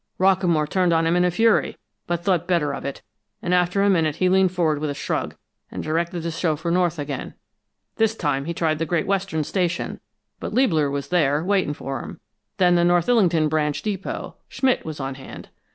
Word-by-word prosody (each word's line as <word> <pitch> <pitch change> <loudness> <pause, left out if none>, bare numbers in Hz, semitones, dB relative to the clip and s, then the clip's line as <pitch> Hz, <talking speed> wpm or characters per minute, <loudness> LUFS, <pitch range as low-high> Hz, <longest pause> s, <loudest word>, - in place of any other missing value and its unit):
"Rockamore 180 -5 +3
turned 180 +1 +2
on 165 0 +2
him 165 +1 +2
in 180 - +3
a 180 - +3
fury, 225 +5 +2 0.3
but 175 0 -2
thought 175 -2 +1
better 165 -6 +1
of - - -6
it, 140 -4 -5 0.4
and 180 - -2
after 180 +2 +2
a 200 - +4
minute 160 -5 +1
he 185 - +2
leaned 190 -1 +4
forward 165 -5 +1
with 155 0 -2
a 145 - -3
shrug, - - -3 0.3
and - - -6
directed 170 +2 -1
the 170 - -2
chauffeur 165 0 -1
north 175 -2 +1
again. 145 -2 -5 0.6
This 220 0 +2
time 145 -7 -1
he 170 - -3
tried 155 -2 0
the 165 - -1
Great 170 0 0
Western 195 -5 -1
Station, 175 +1 -2 0.4
but - - -5
Liebler 165 - +3
was 140 0 -4
there, 150 -3 +2
waiting 185 -6 +1
for 135 -3 -5
him; - - -9 0.4
then 180 -2 +4
the 175 0 +3
North 175 -1 +3
Illington 180 -10 +3
branch 150 -1 -1
depot 200 -3 -4
Schmidt 260 -1 +1
was 155 -2 -6
on 135 0 -3
hand. 130 0 -11
170 Hz, 200 wpm, -23 LUFS, 155-185 Hz, 0.6 s, a